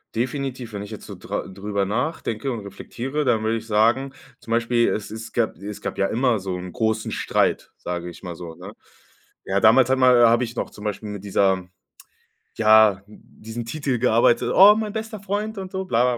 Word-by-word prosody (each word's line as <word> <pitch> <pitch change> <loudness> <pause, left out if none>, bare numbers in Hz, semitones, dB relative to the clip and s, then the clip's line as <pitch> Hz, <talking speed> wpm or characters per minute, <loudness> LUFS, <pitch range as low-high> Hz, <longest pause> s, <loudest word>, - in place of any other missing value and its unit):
definitiv. 125 -1 -3
Wenn 100 - -4
ich 105 - -10
jetzt 110 - -9
so - - -8
dra - - -5
drüber 100 +1 -3
nachdenke 125 +1 -2
und 115 -3 -4
reflektiere, 125 +8 -5
dann 110 -4 +2
würde 110 +1 0
ich 115 0 -9
sagen, 115 +6 +2 0.3
zum 115 - -10
Beispiel, 120 0 +2
es 105 - -3
es 110 +1 -8
gab 115 -7 0
es 100 +3 -8
gab - - -5
ja 100 - +2
immer 120 0 +1
so 95 -1 -4
'n 90 0 -7
großen 110 -1 -1
Streit, - - 0
sage 90 0 -5
ich 85 - -13
mal 90 -3 -6
so, 85 -1 -9
ne? - - -10 0.7
Ja, 95 +1 +1
damals 120 +4 +5
hat 130 - +3
ma 125 -2 +6
habe 120 +2 +3
ich 115 +1 -9
noch - - -3
zum 105 - -12
Beispiel 105 +1 -4
mit 100 -2 -7
dieser 95 -2 +1 0.9
ja, 110 -3 +5
diesem 110 +2 -9
Titel 135 0 -2
gearbeitet, 120 -1 +3
„oh, 205 +2 +8
mein 215 -1 -2
bester 220 -1 -5
Freund“ 205 +2 -3
und 190 -1 -6
so, 190 0 -3
bla, 125 -4 +2
115 Hz, 200 wpm, -23 LUFS, 105-130 Hz, 0.9 s, oh